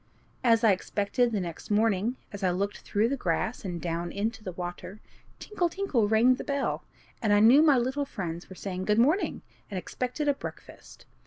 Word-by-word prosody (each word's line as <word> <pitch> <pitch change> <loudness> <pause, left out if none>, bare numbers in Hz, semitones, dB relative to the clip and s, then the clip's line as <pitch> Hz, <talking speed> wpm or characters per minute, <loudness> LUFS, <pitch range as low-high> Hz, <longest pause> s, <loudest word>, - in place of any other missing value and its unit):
As 230 -1 +4
I 220 - +6
expected, 205 +5 0
the 215 - 0
next 170 -3 -6
morning, 215 +2 +2 0.2
as 200 -1 -7
I 185 - +3
looked 195 +3 -2
through 210 +2 0
the 275 - 0
grass 220 +1 -2
and 180 -3 -4
down 170 0 -3
into 215 +2 -3
the 185 - -4
water, 180 +3 -7 0.4
tinkle! 360 -5 -1
tinkle! 325 - 0
rang 225 +4 +5
the - - -5
bell, 280 -1 -2 0.4
and 215 -4 +1
I 205 - +5
knew 235 +7 +7
my 300 -4 +5
little 265 +4 0
friends 175 -9 -6
were 185 - -10
saying, 185 -1 -5
"Good 210 +1 +2
morning!" 295 - +2 0.3
and 200 - -4
expected 255 +10 -3
a 285 - +4
breakfast. - - -10
215 Hz, 190 wpm, -28 LUFS, 185-250 Hz, 0.4 s, knew